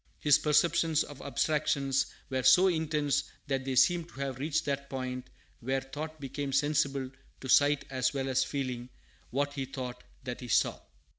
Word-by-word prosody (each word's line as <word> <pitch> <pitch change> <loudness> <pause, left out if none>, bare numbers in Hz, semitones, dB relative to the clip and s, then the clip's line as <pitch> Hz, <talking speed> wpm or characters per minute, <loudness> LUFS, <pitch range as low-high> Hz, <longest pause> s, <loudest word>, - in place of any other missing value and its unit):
His 150 -2 +5
perceptions 155 +1 +3
of 145 -2 -11
abstractions 140 -1 +1 0.2
were 130 0 0
so 155 +10 +6
intense 155 -4 0 0.2
that 135 -2 -2
they 135 -1 -2
seem 175 +6 +4
to 175 - -19
have 135 -2 -4
reached 160 +3 0
that 140 -1 -2
point 130 -1 -4 0.3
where 135 +3 -1
thought 155 +4 -7
became 140 0 -4
sensible 140 -2 +1 0.3
to 130 - -7
sight 145 +2 +4
as 130 -1 +1
well 135 -1 -2
as 130 0 +2
feeling. 130 -3 -4 0.4
What 145 +2 -1
he 135 -1 -3
thought, 125 -2 -6 0.2
that 125 0 -5
he 125 - -7
saw. 100 - +2
135 Hz, 165 wpm, -30 LUFS, 130-150 Hz, 0.4 s, so